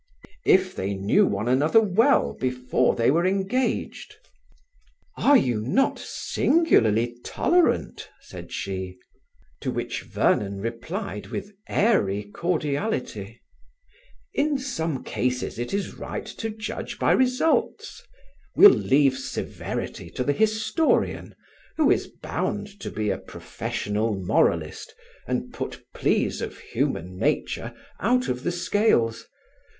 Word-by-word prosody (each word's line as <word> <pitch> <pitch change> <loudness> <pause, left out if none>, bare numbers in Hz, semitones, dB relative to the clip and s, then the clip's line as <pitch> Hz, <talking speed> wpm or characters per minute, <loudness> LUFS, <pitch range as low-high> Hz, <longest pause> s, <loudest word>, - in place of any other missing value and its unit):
"If 185 0 +4
they 100 +1 -2
knew 95 +1 +3
one 100 +3 -2
another 145 - +4
well 225 +6 +3
before 125 0 0
they 115 +2 +3
were 165 +4 +2
engaged." 195 +7 -1 1.0
"Are 285 0 +5
you 120 - +1
not 265 - +1
singularly 120 - +2
tolerant?" 350 0 +1
said - - -11
she. 95 -1 -4 0.6
To - - -3
which - - -3
Vernon 100 -1 0
replied 120 - -5
with 205 +1 -6 0.2
airy 105 - +2
cordiality: 140 - -3 0.9
"In 290 0 +1
some 165 - -3
cases 125 -2 -2
it 120 - -3
is 200 0 -2
right - - -6
to 225 - -5
judge 215 0 -6
by - - +2
results; 255 +5 +1 0.5
we'll 410 - +10
leave 135 - +3
severity 130 - -5
to 125 - -3
the 145 - +1
historian, 220 - +1 0.4
who 310 -3 +4
is - - +1
bound 205 0 -4
to - - -5
be 105 -1 -1
a - - -2
professional 105 +1 -3
moralist 95 -2 0 0.3
and - - -3
put - - -6
pleas - - 0
of - - -5
human 90 +2 -3
nature - - -1 0.3
out 250 +5 +1
of 125 0 -2
the 175 - -1
scales. 175 - +1
150 Hz, 115 wpm, -25 LUFS, -, 1.0 s, we'll